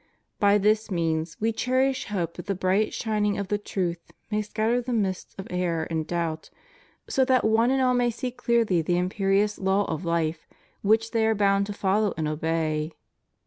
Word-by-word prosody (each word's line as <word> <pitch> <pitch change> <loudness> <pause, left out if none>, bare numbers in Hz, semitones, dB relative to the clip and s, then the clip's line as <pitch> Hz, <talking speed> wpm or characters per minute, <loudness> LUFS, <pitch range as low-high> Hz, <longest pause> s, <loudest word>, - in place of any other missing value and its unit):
By 205 0 +5
this 215 +2 +2
means 165 -3 -1
We 225 +1 +1
cherish 260 +3 0
hope 175 -6 -2
that 175 - -9
the 200 - 0
bright 190 +3 +1
shining 210 -2 0
of 200 -2 -4
the 205 - 0
truth 175 -4 -3 0.2
may 210 0 +1
scatter 220 +3 0
the 245 +1 -4
mists 195 -5 -2
of 195 - -6
error 175 -3 0
and 160 -1 -2
doubt, 165 -2 -3 0.6
so 265 - +2
that 255 -1 +3
one 225 +2 +3
and 265 0 +2
all 255 -1 +3
may 245 -1 +2
see 245 +2 -4
clearly 235 -7 +1
the 175 +2 0
imperious 195 +3 +1
law 195 +1 +2
of 160 -1 -3
hfe 170 -2 0 0.4
which 220 +2 +2
they 225 -1 +1
are 220 - +2
bound 200 -1 +2
to 205 - -4
follow 200 +1 +1
and 155 -1 -1
obey. 155 0 -1
200 Hz, 185 wpm, -26 LUFS, 170-220 Hz, 0.6 s, By